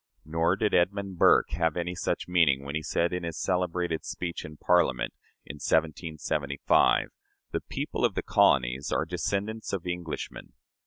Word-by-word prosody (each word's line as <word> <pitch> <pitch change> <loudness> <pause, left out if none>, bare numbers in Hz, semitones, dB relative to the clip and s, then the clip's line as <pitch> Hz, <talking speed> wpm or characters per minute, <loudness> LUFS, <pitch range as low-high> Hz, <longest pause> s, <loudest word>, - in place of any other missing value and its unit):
Nor 80 +3 +1
did 105 +1 0
Edmund 95 0 +1
Burke - - +5
have 80 -1 0
any 90 +1 -2
such - - -2
meaning 80 -7 +3
when 70 - -5
he 80 - -1
said, 85 +3 0
in 90 - -2
his 85 -2 -5
celebrated 90 -2 -1
speech 85 -1 -4
in 75 0 -10
Parliament, 75 -9 +2 0.3
in 75 - -8
1775, 75 -2 +1 0.4
"The - - -2
people - - -4
of - - +2
the - - -1
colonies 65 +2 +2
are - - +1
descendants 105 +2 -3
of 95 -3 -3
Englishmen." 90 -3 -5
85 Hz, 155 wpm, -28 LUFS, 75-90 Hz, 0.4 s, Burke